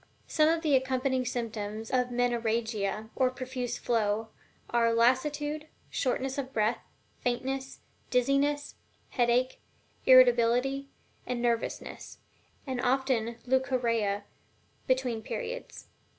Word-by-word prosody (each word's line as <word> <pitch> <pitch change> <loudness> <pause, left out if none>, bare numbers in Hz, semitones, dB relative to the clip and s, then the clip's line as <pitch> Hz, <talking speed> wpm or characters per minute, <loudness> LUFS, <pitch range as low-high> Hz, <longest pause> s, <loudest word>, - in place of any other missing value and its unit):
Some 310 -1 +3
of 330 0 +1
the 300 -3 +4
accompanying 260 0 +1
symptoms 220 -3 -4
of 250 -1 +2
Menorrhagia, 225 -3 -1
or 260 -1 +3
profuse 255 -1 -4
flow, 220 -1 0 0.4
are 235 -1 +3
lassitude, 295 +5 +1 0.2
shortness 265 +1 -1
of 265 -1 -4
breath, 220 -1 +1 0.4
faintness, 265 +2 -3 0.3
dizziness, 275 +3 +1 0.4
headache, 245 +1 +1 0.5
irritability 255 +2 +5 0.4
and 250 -1 -2
nervousness, 235 -1 -2 0.5
and 260 -3 -2
often 255 -2 +1
also 235 0 -7
leucorrhea 240 -6 +1 0.6
between 255 -3 +1
periods. - - -6
250 Hz, 100 wpm, -29 LUFS, 230-265 Hz, 0.6 s, irritability